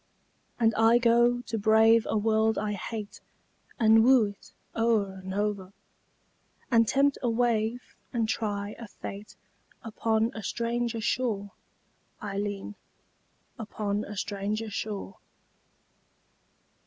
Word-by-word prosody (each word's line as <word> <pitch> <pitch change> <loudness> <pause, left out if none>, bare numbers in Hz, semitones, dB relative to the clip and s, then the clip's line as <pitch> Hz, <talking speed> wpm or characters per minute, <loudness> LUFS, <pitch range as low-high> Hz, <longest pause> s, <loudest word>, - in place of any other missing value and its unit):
And 225 -1 +3
I 225 +2 +5
go 240 0 +3
to 230 -2 -4
brave 220 +2 +5
a - - +1
world 220 +1 +2
I 210 0 -1
hate 210 +1 -6 0.6
And 220 -1 +6
woo 250 -2 +6
it 200 - -15 0.2
o'er 215 -4 +1
and 190 - -6
o'er, 200 -1 -2 1.0
And 230 -2 +4
tempt 275 +3 +2
a 245 - 0
wave 230 0 -1 0.2
and 230 -2 0
try 205 -2 -2
a 230 - -8
fate 200 +1 -9 0.5
Upon 225 0 0
a 220 - -6
stranger 235 +1 -2
shore, 215 -4 -1 0.7
Ailleen. 205 0 -4 0.9
Upon 210 -1 -3
a 210 0 -8
stranger 210 +2 -3
shore. 205 -1 -5
220 Hz, 115 wpm, -28 LUFS, 205-230 Hz, 1.0 s, And